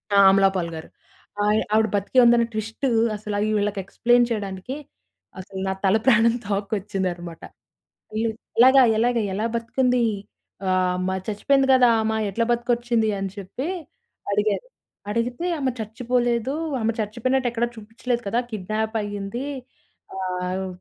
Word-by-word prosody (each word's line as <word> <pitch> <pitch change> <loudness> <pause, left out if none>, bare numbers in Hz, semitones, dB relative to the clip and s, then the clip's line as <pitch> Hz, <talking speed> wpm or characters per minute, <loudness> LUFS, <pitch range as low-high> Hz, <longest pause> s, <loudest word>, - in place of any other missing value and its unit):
ఆ! - - +5
'అమలా 195 0 +5
పాల్' 170 -2 -2
గారు 160 - -8 0.5
ఆహ్, 210 +1 +3
ఆవిడ 220 0 +4
బ్రతికే 205 +6 +2
ఉందని 235 0 +5
ట్విస్ట్ 225 +5 -3 0.3
అసల 210 0 -5 0.2
వీళ్ళకి 205 -1 -1
ఎక్స్‌ప్లైన్ 240 +3 +3
చేయడానికి 200 +3 -4 0.6
అసలు 190 0 -8
నా 190 - 0
తల 195 +2 +4
ప్రాణం 230 -2 +5
తోక్కొచ్చిందన్నమాట. 195 -4 -3 0.7
వీళు 225 0 0 0.3
"ఎలాగా 260 +2 +8 0.2
ఎలాగా 235 0 +2
ఎలా 210 +4 -1
బతికింది 245 +1 +1 0.7
ఆహ్, 185 -1 +1
మ - - 0 0.2
చచ్చిపోయింది 270 +6 +2
కదా! 250 -2 +5
ఆమ 220 - 0 0.2
ఎట్లా 230 +4 0
బతికొచ్చింది" 235 -2 0
అని 195 -1 -3
చెప్పి 200 - -5 0.6
అడిగారు. 210 - 0 0.5
అడిగితే 240 +8 -2
ఆమె 265 -2 0
చచ్చిపోలేదు 240 +2 -1 0.3
ఆమె 220 - +1
చచ్చిపోయినట్టు 245 +5 0
ఎక్కడా 240 0 0
చూపించలేదు 235 +3 -3
కదా! 230 +4 +1
కిడ్నాప్ 215 +2 -3
అయ్యింది. 205 +5 -5 0.7
ఆహ్, 185 0 -3
220 Hz, 125 wpm, -23 LUFS, 195-240 Hz, 0.7 s, ఎలాగా